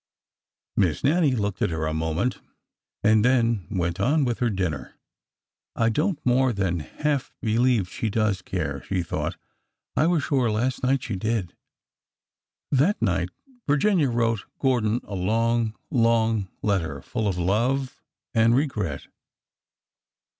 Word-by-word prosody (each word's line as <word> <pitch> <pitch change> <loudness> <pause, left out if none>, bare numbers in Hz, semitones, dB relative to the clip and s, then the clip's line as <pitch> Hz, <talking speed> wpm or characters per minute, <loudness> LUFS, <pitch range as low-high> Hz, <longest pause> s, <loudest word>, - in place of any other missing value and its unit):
Miss 85 -7 +1
Nannie 150 -2 +3
looked 100 -4 -2
at - - +2
her 80 -1 -2
a 80 - -1
moment 80 +10 -1 0.6
and 110 0 +5
then 115 -7 +2
went 90 -3 -1
on 145 +2 +2
with 120 -2 -1
her 120 - +2
dinner. 90 -8 -3 0.8
I 115 0 +2
don't 150 - 0
more 125 0 +3
than 95 -4 0
half 145 - -2
believe 115 -2 +2
she 110 +5 -3
does 105 -3 0
care," 80 -8 -3
she 95 -2 0
thought. 85 - -3 0.3
'' - - -58
I 155 - +3
was 170 -5 +2
sure 130 -5 +1
last 120 +5 -1
night 135 0 +1
she 110 - -3
did." 105 -2 -2 1.2
That 150 - +3
night - - 0 0.4
Virginia 150 +1 +3
wrote 115 -2 0
Gordon 120 -4 +1
a - - -9
long, 115 +4 +1 0.2
long 115 - +2 0.2
letter, 80 -9 -1
full 110 -3 -2
of 95 -3 -1
love 120 +9 0 0.3
and 115 +1 +4
regret. 105 - -1
115 Hz, 140 wpm, -25 LUFS, 95-130 Hz, 1.2 s, and